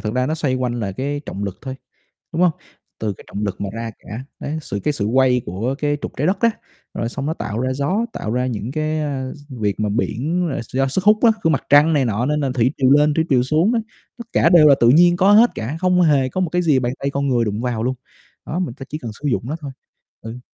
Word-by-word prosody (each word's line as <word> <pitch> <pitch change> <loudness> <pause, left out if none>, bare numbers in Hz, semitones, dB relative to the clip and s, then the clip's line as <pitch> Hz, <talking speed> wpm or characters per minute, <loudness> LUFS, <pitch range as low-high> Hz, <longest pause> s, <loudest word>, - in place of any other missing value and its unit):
thực 110 +2 -3
ra 125 0 +1
nó 155 - -1
xoay 150 -5 -1
quanh 125 -2 -1
là 100 -3 -3
cái 140 +6 -3
trọng 100 - -4
lực 100 -3 -5
thôi, 130 -1 -5 0.6
đúng 165 - 0
hông? 180 -2 +5 0.5
Từ 105 -2 -2
cái - - -15
trọng 105 - -5
lực 100 -2 -3
mà 100 - -2
ra 115 0 -5
cả, 110 +4 -8 0.2
đấy, 155 +2 -4
sự 100 -8 -5
cái 150 - +1
sự 105 -7 -2
quay 125 +2 +3
của 110 +10 -3
cái 145 -1 0
trục - - -4
Trái 150 - +1
Đất 190 - +1
á, 230 - +4 0.4
rồi 115 - -3
xong 135 +3 -5
nó 155 - -1
tạo 110 -9 -4
ra 130 +1 -1
gió, 150 - 0
tạo 110 - -4
ra 125 +1 0
những 115 -1 -4
cái, 155 +1 -1
ơ, 135 -3 -3 0.2
việc 105 -7 -2
mà 105 -1 0
biển 150 - -1
là 135 - -3
do 135 +1 +1
sức 185 +8 -1
hút 215 +1 +5
á 230 - +7
của 165 - +3
Mặt 150 - +1
Trăng 145 +3 +6
này 140 -4 +2
nọ 115 +1 0
nên 150 +2 0
là 140 -2 0
thủy 125 0 +2
triều 130 -1 +3
lên 150 +2 +5
thủy 160 +1 +1
triều 125 -4 +3
xuống 155 - +2
đó, 235 - +2 0.4
tất 235 - -7
cả - - +4
đều 170 -4 +7
là 140 - +7
tự 120 - +5
nhiên 175 +5 +5
có 195 +1 +4
hết 225 +4 +7
cả, 125 +8 -4
không 180 0 +3
hề 140 -6 +3
có 185 - -2
một 180 - 0
cái 180 +2 0
gì 155 -6 +3
bàn 125 0 -1
tay 140 - -1
con 140 0 -1
người 120 -3 +2
đụng 105 +1 -2
vào 120 -3 -2
luôn. 130 +2 -1 0.5
Đó, 170 - -3
mình 175 -10 -2
phải 135 - -8
chỉ 155 - -4
cần 120 -7 -7
sử 150 - -2
dụng 120 - 0
nó 145 +5 -3
thôi. 140 -2 -6 0.5
Ừ. 115 +2 -8
135 Hz, 280 wpm, -20 LUFS, 120-155 Hz, 0.6 s, á